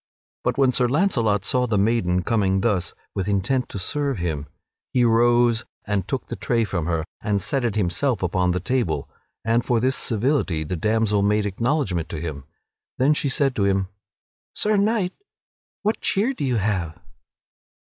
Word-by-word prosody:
But, -, -, 0 dB
when 135 Hz, -2 st, +4 dB
Sir 125 Hz, -1 st, +2 dB
Launcelot 120 Hz, -, +1 dB
saw 125 Hz, +4 st, +1 dB
the 110 Hz, -3 st, +1 dB
maiden 95 Hz, -4 st, +1 dB
coming 95 Hz, -4 st, +1 dB
thus 95 Hz, -6 st, 0 dB, 0.2 s
with 95 Hz, -1 st, -2 dB
intent 105 Hz, +6 st, 0 dB
to -, -, -6 dB
serve 140 Hz, +7 st, -1 dB
him, 80 Hz, -4 st, -3 dB, 0.5 s
he 125 Hz, -, +3 dB
arose 120 Hz, 0 st, +3 dB, 0.2 s
and 100 Hz, -3 st, -1 dB
took 135 Hz, -, -3 dB
the -, -, -6 dB
tray 115 Hz, -1 st, 0 dB
from 90 Hz, -6 st, -2 dB
her 80 Hz, -2 st, -1 dB, 0.2 s
and 105 Hz, -1 st, 0 dB
set 135 Hz, +5 st, 0 dB
it 115 Hz, -4 st, 0 dB
himself 105 Hz, +4 st, 0 dB
upon 90 Hz, +1 st, +1 dB
the 90 Hz, +1 st, 0 dB
table; 105 Hz, -4 st, -1 dB, 0.4 s
and 115 Hz, +1 st, +2 dB
for 120 Hz, -2 st, +1 dB
this 130 Hz, +3 st, +1 dB
civility 110 Hz, -, +1 dB
the 80 Hz, +4 st, -3 dB
damsel 105 Hz, +3 st, +1 dB
made 105 Hz, +1 st, +2 dB
acknowledgement 100 Hz, -, -1 dB
to 80 Hz, -, -5 dB
him. 75 Hz, -4 st, -6 dB, 0.5 s
Then 135 Hz, +4 st, +4 dB
she 145 Hz, -1 st, 0 dB
said 135 Hz, -1 st, +1 dB
to 100 Hz, -, +2 dB
him: 95 Hz, -1 st, +1 dB, 0.7 s
"Sir 215 Hz, 0 st, +2 dB
Knight, 205 Hz, -2 st, +1 dB, 0.7 s
what 215 Hz, +2 st, 0 dB
cheer 220 Hz, +8 st, +1 dB
do 195 Hz, -, -5 dB
you 125 Hz, -2 st, 0 dB
have?" 95 Hz, -6 st, -1 dB
110 Hz, 170 wpm, -23 LUFS, 95-130 Hz, 0.7 s, when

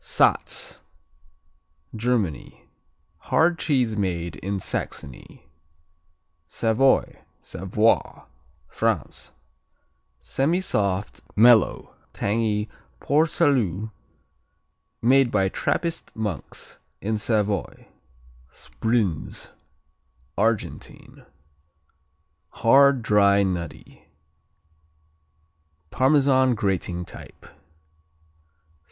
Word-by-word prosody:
Satz -, -, 0 dB, 1.1 s
Germany 110 Hz, -, -2 dB, 0.5 s
Hard 165 Hz, -, +1 dB
cheese 125 Hz, -8 st, +1 dB
made 85 Hz, -5 st, -2 dB
in 100 Hz, +1 st, -3 dB
Saxony. 70 Hz, -6 st, -6 dB, 1.0 s
Savoy, 115 Hz, -, +1 dB, 0.2 s
Savoie 100 Hz, +6 st, 0 dB, 0.4 s
France -, -, -2 dB, 0.9 s
Semisoft; 105 Hz, -, -1 dB
mellow; 115 Hz, +1 st, +4 dB, 0.2 s
tangy 105 Hz, 0 st, -1 dB, 0.3 s
Port 155 Hz, +3 st, +2 dB
Salut 110 Hz, -, +1 dB, 1.1 s
made 130 Hz, +1 st, +4 dB
by 95 Hz, -4 st, +1 dB
Trappist 165 Hz, -, -2 dB
monks 105 Hz, -6 st, -5 dB, 0.2 s
in 110 Hz, +1 st, -2 dB
Savoy. 105 Hz, -3 st, -2 dB, 0.6 s
Sbrinz 110 Hz, -, -3 dB, 0.8 s
Argentine 110 Hz, +1 st, -3 dB, 1.2 s
Hard; 135 Hz, +1 st, +4 dB
dry; 100 Hz, -2 st, +4 dB
nutty; 90 Hz, -3 st, -5 dB, 1.8 s
Parmesan 130 Hz, -2 st, +3 dB
grating 90 Hz, -3 st, -2 dB
type. -, -, -13 dB
110 Hz, 60 wpm, -24 LUFS, 100-130 Hz, 1.8 s, mellow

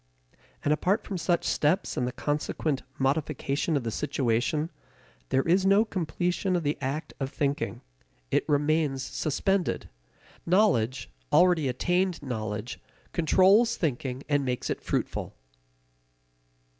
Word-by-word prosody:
And 150 Hz, -, +4 dB
apart 190 Hz, +7 st, +1 dB
from 190 Hz, -3 st, -4 dB
such 170 Hz, +1 st, +1 dB
steps 160 Hz, +7 st, +1 dB
and 125 Hz, -, 0 dB
the -, -, -2 dB
consequent 145 Hz, 0 st, -2 dB, 0.2 s
modification 140 Hz, +2 st, 0 dB
of 135 Hz, -, -3 dB
the 115 Hz, -, -2 dB
situation, 140 Hz, +4 st, 0 dB, 0.6 s
there 135 Hz, -, +2 dB
is 185 Hz, +3 st, +4 dB
no 200 Hz, +3 st, +5 dB
completion 180 Hz, 0 st, -1 dB
of 175 Hz, -, 0 dB
the 145 Hz, 0 st, 0 dB
act 140 Hz, +4 st, -3 dB
of 135 Hz, -1 st, -2 dB
thinking. 140 Hz, -1 st, -2 dB, 0.5 s
It -, -, +3 dB
remains 145 Hz, -2 st, +1 dB
suspended. 180 Hz, +8 st, -1 dB, 0.5 s
Knowledge, 170 Hz, -, +2 dB, 0.2 s
already 175 Hz, -5 st, +4 dB
attained 175 Hz, +7 st, 0 dB
knowledge, 110 Hz, -1 st, -4 dB, 0.3 s
controls 190 Hz, +7 st, +4 dB
thinking 130 Hz, -4 st, -2 dB
and 145 Hz, -2 st, +2 dB
makes 125 Hz, -2 st, -2 dB
it -, -, -3 dB
fruitful. -, -, -3 dB
150 Hz, 120 wpm, -27 LUFS, 135-180 Hz, 0.6 s, no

